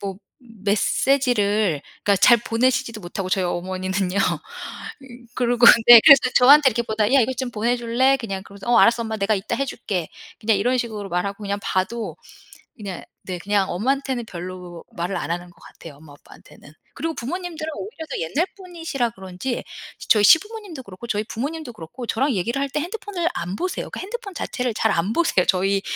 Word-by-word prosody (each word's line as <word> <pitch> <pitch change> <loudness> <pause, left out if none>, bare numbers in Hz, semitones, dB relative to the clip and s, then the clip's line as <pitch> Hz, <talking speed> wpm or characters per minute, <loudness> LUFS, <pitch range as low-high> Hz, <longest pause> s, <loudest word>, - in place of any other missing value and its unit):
뭐 195 -2 -5 0.2
메시지를 215 - 0 0.2
그러니까 200 -1 +3
잘 240 +5 +6
보내시지도 230 0 0
못 175 +2 -9
하고 190 -2 -2
저희 185 0 0
어머니는요. 185 +2 -2
어 195 - +1 0.9
그러고 245 -1 +3 0.2
네 240 -1 +11
그래서 275 -3 +10 0.2
저한테 280 +2 +7
이렇게 235 0 -1
보다 220 0 -1
"야 275 - +6
이거 250 +2 +1
좀 255 0 -4
보내줄래?" 240 +3 +1
그냥 195 -6 -5
그러면서 200 +2 -12
"어 245 - +5
알았어. 235 0 +4
엄마 220 -1 -4
내가 205 +1 +1
이따 195 -1 -3
해줄게." 200 - -3 0.3
그냥 220 -1 +2
이런 245 +6 +1
식으로 215 -4 -4
말하고 200 +4 -2
그냥 200 0 -2
봐도 205 +5 -2 0.6
그냥 200 -6 -7 0.2
네 185 -1 -5
그냥 200 +1 0
엄마한테는 260 +5 -1
별로 180 -2 -8
말을 175 +3 -3
안 175 - -4
하는 175 +1 -4
것 - - -24
같아요 160 -4 -13
엄마 150 0 -15
아빠한테는. 145 0 -17 0.2
그리고 325 +3 -3
부모님들은 325 +4 -5
오히려 350 -5 -7
더 - - -3
옛날 260 - 0
분이시라 330 -10 -3
그런지 190 +4 -5 0.5
저희 210 -2 +5
시부모님도 395 - +3
그렇고 195 0 -11
저희 210 -2 -1
부모님도 285 +5 -5
그렇고 215 +5 -9
저랑 270 +6 0
얘기를 230 +8 -1
할 280 - -1
때 300 - -2
핸드폰을 360 0 -3
안 180 +2 -4
보세요. 365 - -3
그 - - -6
핸드폰 410 0 -7
자체를 250 -7 -3
잘 220 - +1
안 175 +4 0
보세요. 280 - +2
저희 195 +1 +1
225 Hz, 415 characters per minute, -22 LUFS, 190-265 Hz, 0.9 s, 네